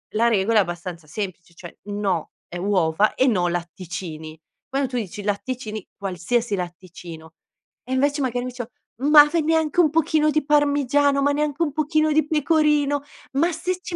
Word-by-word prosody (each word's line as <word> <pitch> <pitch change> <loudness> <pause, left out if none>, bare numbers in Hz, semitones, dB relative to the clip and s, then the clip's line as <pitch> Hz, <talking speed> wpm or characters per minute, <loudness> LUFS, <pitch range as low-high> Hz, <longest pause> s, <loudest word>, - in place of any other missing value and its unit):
la 230 +2 +3
regola 215 +1 +3
è - - +6
abbastanza 175 -2 -6
semplice, 180 -1 -6
cioè: 175 0 -11
no 200 -5 -2 0.2
è 175 - -7
uova, 185 0 +1
e 260 - +3
no 185 -8 +2
latticini. 170 -2 -6 0.3
Quando 270 0 0
tu 250 - -7
dici 210 -2 -5
latticini, 215 0 -4
qualsiasi 200 +4 -1
latticino, 175 -2 -8 0.5
e 255 - -10
invece, 285 +2 +1
magari, 250 -2 -1
mi 255 - -4
diceva: 245 -2 -7 0.3
"Ma 295 +1 +8
ve 325 +2 0
neanche 320 +2 +1
un 310 - +4
pochino 310 -1 +2
di 305 -1 0
parmigiano, 285 -1 +2
ma 285 +1 +3
neanche 295 +1 -2
un 305 - -1
pochino 310 0 +1
di 310 0 +3
pecorino, 300 -2 +2 0.3
ma 325 +6 +2
se 360 +3 -3
ci 355 - -6
245 Hz, 170 wpm, -22 LUFS, 185-295 Hz, 0.5 s, Ma